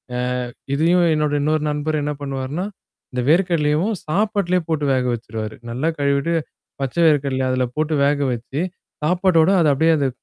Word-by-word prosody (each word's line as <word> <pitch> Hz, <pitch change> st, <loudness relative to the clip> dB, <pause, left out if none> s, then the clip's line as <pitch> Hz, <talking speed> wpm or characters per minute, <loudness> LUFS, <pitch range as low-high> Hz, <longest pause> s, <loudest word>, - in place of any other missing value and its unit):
அ -, -, -1 dB, 0.6 s
இதையும் 170 Hz, +4 st, +3 dB
என்னோட 150 Hz, -1 st, 0 dB
இன்னொரு 155 Hz, 0 st, +1 dB
நண்பர் 150 Hz, +1 st, -1 dB
என்ன 150 Hz, +1 st, -1 dB
பண்ணுவாார்ன்னா, 140 Hz, +5 st, -3 dB, 0.5 s
இந்த 125 Hz, -, -1 dB
வேர்க்கடலையவும் 170 Hz, +2 st, +2 dB
சாப்பாட்லயே 190 Hz, 0 st, +1 dB
போட்டு 155 Hz, -3 st, 0 dB
வேக 130 Hz, -1 st, +1 dB
வச்சுருவாரு. 110 Hz, -2 st, -5 dB, 0.2 s
நல்லா 130 Hz, +7 st, -1 dB
கழுவிட்டு 140 Hz, +3 st, +1 dB, 0.5 s
பச்சை 135 Hz, +5 st, -1 dB
வேர்கடலைய 140 Hz, -3 st, +2 dB
அதுல 130 Hz, 0 st, +1 dB
போட்டு 155 Hz, 0 st, 0 dB
வேக 145 Hz, +1 st, +2 dB
வச்சு, 120 Hz, +5 st, -4 dB, 0.4 s
சாப்பாட்டோட 180 Hz, 0 st, +3 dB
அத 165 Hz, -, +3 dB
அப்படியே 160 Hz, +4 st, +3 dB
அந்த 140 Hz, -, +1 dB
150 Hz, 145 wpm, -21 LUFS, 135-170 Hz, 0.6 s, இதையும்